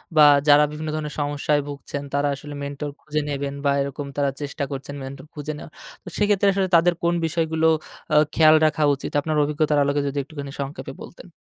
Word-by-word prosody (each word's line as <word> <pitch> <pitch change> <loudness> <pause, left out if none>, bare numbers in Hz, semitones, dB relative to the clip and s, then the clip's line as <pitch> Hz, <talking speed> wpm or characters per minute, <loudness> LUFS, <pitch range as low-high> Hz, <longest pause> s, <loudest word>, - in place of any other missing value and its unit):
বা, 150 -1 +8 0.2
যারা 145 +1 +7
বিভিন্ন 155 +1 -5
ধরনের 150 -1 -4
সমস্যায় 145 0 0
ভুগছেন 145 0 -6
তারা 145 0 +1
আসলে 145 +2 -9
মেন্টর 140 +1 -4
খুঁজে 150 0 -2
নিবেন 140 0 -3
বা, 140 - +4
এরকম 140 +1 -4
তারা 140 -1 +2
চেষ্টা 140 0 -4
করছেন 140 +1 -6
মেন্টর 135 +3 -8
খুঁজে 150 0 -5
নেওয়া। 155 - -10 0.3
তো - - -19
সেক্ষেত্রে 205 -1 +3
আসলে 190 -1 +1
তাদের 175 +1 +5
কোন 170 0 +2
বিষয়গুলো 160 0 +1 0.5
আ - - +4 0.2
খেয়াল 155 -1 +7
রাখা 155 0 +1
উচিত 135 - -7
আপনার 155 +1 -2
অভিজ্ঞতার 150 0 +1
আলোকে 140 +1 +1
যদি 140 +1 -4
একটুখানি 140 -1 -8
সংক্ষেপে 140 +2 -6
বলতেন। 175 +1 -13
150 Hz, 190 wpm, -23 LUFS, 140-155 Hz, 0.5 s, বা